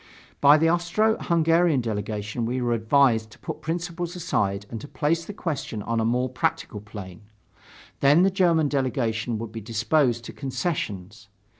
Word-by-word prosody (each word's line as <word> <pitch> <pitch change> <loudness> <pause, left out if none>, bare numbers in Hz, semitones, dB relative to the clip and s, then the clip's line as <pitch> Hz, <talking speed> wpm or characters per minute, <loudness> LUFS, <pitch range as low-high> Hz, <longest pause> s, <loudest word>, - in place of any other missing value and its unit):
By 145 +1 +7
the 165 +1 +3
Austro 175 +6 +2
Hungarian 165 -2 +3
delegation 105 0 -3
we 125 +3 -1
were 120 -1 0
advised 115 -1 +3
to - - -16
put - - -7
principle 175 +1 -3
aside 130 - -2
and 115 - -5
to - - -8
place 165 +3 -1
the - - -6
question 145 - -4
on 115 +1 -1
a 110 - +1
more 125 +2 +1
practical 125 -4 -2
plane. 100 -4 -10 0.8
Then 145 +5 +5
the 195 - +3
German 170 -5 +3
delegation 120 -5 -1
would 110 0 -6
be 115 0 -7
disposed 120 +3 +1
to - - -8
concessions.... 110 - -4
130 Hz, 160 wpm, -25 LUFS, 110-165 Hz, 0.8 s, By